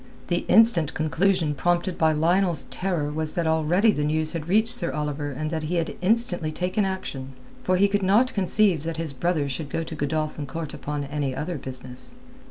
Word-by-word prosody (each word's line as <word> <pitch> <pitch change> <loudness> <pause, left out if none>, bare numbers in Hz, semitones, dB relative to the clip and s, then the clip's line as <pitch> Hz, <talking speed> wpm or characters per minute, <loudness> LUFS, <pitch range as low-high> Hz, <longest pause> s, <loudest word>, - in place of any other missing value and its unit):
The 175 -1 0
instant 190 -8 +4
conclusion 160 0 +1
prompted 175 +5 0
by 160 -1 +3
Lionel's 170 +3 +2
terror 175 -6 -1
was 155 0 0
that 170 - 0
already 160 +7 +3
the 150 - -1
news 155 +1 0
had 165 -1 -5
reached 220 +4 +3
Sir 170 - -2
Oliver 150 -1 -3
and 155 +3 -4
that 160 -1 -2
he 155 +3 -2
had 165 -1 -1
instantly 185 -5 +1
taken 185 +5 0
action; 135 -8 -5 0.3
for 185 0 +1
he 200 +2 +5
could 200 0 0
not 210 +7 +3
conceive 195 -3 +2
that 165 +1 -4
his 160 -3 -3
brother 155 +1 0
should 140 +2 -4
go 165 - -2
to 160 - -7
Godolphin 155 0 -2
Court 160 +2 -5
upon 150 -1 -4
any 140 -2 -3
other 160 +1 -3
business. 130 - -6
160 Hz, 190 wpm, -25 LUFS, 150-185 Hz, 0.3 s, he